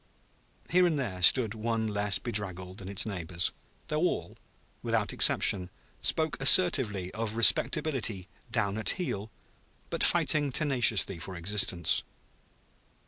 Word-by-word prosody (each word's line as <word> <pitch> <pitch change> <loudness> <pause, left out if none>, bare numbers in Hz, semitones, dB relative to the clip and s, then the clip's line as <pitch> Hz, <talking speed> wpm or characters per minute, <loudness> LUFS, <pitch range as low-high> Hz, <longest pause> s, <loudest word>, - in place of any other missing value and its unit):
Here 180 +1 +3
and 160 -3 -2
there 95 -9 -6
stood 110 +4 +5
one 115 0 -4
less 105 -2 -1
bedraggled 95 -5 -5
than 95 -1 -10
its 100 0 -2
neighbors, 90 -4 -2 0.4
though 150 - -3
all, 85 - -3 0.5
without - - -3
exception, 90 -2 +4 0.3
spoke 155 -3 0
assertively 130 - +4
of 110 -1 -5
respectability 115 - +2 0.2
down 110 -3 -3
at 110 - -7
the - - +4
heel 110 - -6 0.6
but - - -2
fighting 145 -2 0
tenaciously 120 - 0
for 90 +2 -9
existence. 90 -1 +1
105 Hz, 125 wpm, -27 LUFS, 95-130 Hz, 0.6 s, stood